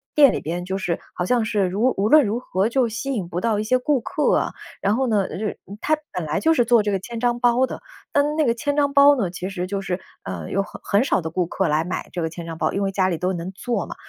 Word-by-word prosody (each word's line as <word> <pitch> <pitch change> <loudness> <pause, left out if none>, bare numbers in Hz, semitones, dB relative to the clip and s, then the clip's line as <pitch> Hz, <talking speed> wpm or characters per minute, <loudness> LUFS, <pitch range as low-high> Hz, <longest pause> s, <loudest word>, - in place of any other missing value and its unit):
店 285 -3 +7
里 - - -1
边 175 +3 -3
就 190 +1 -2
是 175 -3 -2 0.2
好 180 - -1
像 240 +3 +2
是 210 -2 +1
如 210 +8 +1
无 200 +2 +2
论 305 +2 +7
如 215 +3 -1
何 200 -4 0
就 250 0 +2
吸 240 +5 -4
引 200 -8 -3
不 175 +1 -4
到 220 -1 +1
一 - - -1
些 255 +4 +2
顾 275 +2 +1
客 295 +6 +1
啊。 - - -1 0.3
然 200 +2 +2
后 265 +2 +1
呢， 210 -4 +1
就 - - -6
是 210 0 -3 0.2
他 310 - +2 0.2
本 180 -3 -3
来 150 +1 -1
就 325 - +3
是 240 - +3
做 235 -1 +5
这 205 - 0
个 195 - +1
千 230 +4 -7
张 240 0 +1
包 245 +1 +3
的， - - -7 0.3
但 290 +1 +2
那 315 - +2
个 235 - +3
千 285 +4 -1
张 285 -1 +2
包 285 +1 +7
呢， 215 -9 -1
其 180 +1 -5
实 180 -2 -4
就 200 +1 -2
是， 185 -1 -3 0.2
呃， 90 -4 -6
有 195 - 0
很 - - -11
很 205 +3 +2
少 265 - +1
的 160 - -4
顾 175 +2 0
客 190 +2 -1
来 155 +1 +1
买 180 +2 -4
这 175 - -3
个 160 - -1
千 170 +1 -7
张 165 -1 -6
包， - - 0
因 200 - -1
为 195 -1 0
家 190 -1 +1
里 170 - -1
都 180 +1 0
能 175 +1 -5
做 200 0 -2
嘛。 - - -8
205 Hz, 315 characters per minute, -22 LUFS, 180-245 Hz, 0.3 s, 店